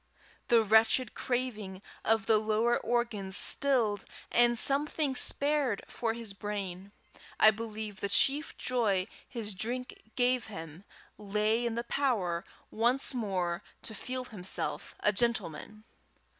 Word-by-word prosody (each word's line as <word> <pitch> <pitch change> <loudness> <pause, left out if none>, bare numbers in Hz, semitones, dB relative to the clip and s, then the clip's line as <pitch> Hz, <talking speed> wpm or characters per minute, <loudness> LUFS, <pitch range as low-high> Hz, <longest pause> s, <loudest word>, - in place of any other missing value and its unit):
The 230 -2 +5
wretched 220 +3 +3
craving 220 -7 -3 0.2
of 225 0 +2
the 220 -2 +4
lower 220 +2 +1
organs 220 -5 0
stilled, 235 -8 +4 0.3
and 240 0 +4
something 280 +1 +3
spared 280 -6 +1
for 225 -1 -2
his 230 -4 -7
brain, 200 -2 -6 0.5
I 215 - +8
believe 215 -2 -6
the 200 - -2
chief 280 +8 +2
joy 215 -7 0 0.2
his 220 -4 -5
drink 245 +3 -5
gave 250 0 +1
him 165 -2 -9 0.3
lay 215 +3 0
in 230 - -3
the 235 - -2
power 215 -11 0 0.3
once 245 +5 +2
more 185 -7 -2 0.2
to 220 - -4
feel 255 +4 -4
himself 180 -8 -5
a 210 - +3
gentleman. 215 -2 -1
220 Hz, 125 wpm, -30 LUFS, 200-245 Hz, 0.5 s, I